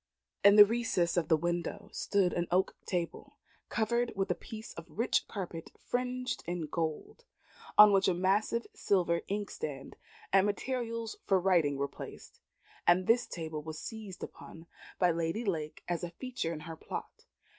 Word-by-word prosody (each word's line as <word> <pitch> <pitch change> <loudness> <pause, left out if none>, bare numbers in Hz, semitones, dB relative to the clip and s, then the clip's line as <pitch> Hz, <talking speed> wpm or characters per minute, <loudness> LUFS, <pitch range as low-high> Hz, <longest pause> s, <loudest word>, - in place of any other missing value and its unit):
In 200 +1 +8
the 210 -1 +11
recess 210 -6 0
of 170 -3 +1
the 160 - +4
window 170 +2 -2
stood 195 -3 +1
an 175 0 -1
oak 185 +2 +2
table, 175 -2 -3 0.3
covered 235 +2 +1
with 195 -1 0
a - - +4
piece 220 0 -9
of 170 0 -9
rich 225 +10 +1
carpet 175 -5 -6
fringed 250 0 -2
with 170 -4 -3
gold, 165 - -3 0.5
on 210 0 +10
which 195 0 +4
a 185 - +3
massive 200 +6 +1
silver 175 -4 +1
inkstand 210 - -4 0.4
and 195 +1 +6
materials 230 +1 -3
for 190 -1 +4
writing 170 -7 +3
were 140 +1 0
placed; 140 - -10 0.5
and 180 +1 +5
this 235 +4 +3
table 160 -3 -5
was 160 +1 -7
seized 215 -1 -7
upon 165 0 -10 0.3
by 180 -2 +4
Lady 165 +7 -1
Lake 155 -6 -3
as 175 0 -2
a 175 - -2
feature 245 -2 -4
in 155 -2 -5
her 165 +1 -7
plot. - - -7
185 Hz, 160 wpm, -32 LUFS, 170-220 Hz, 0.5 s, the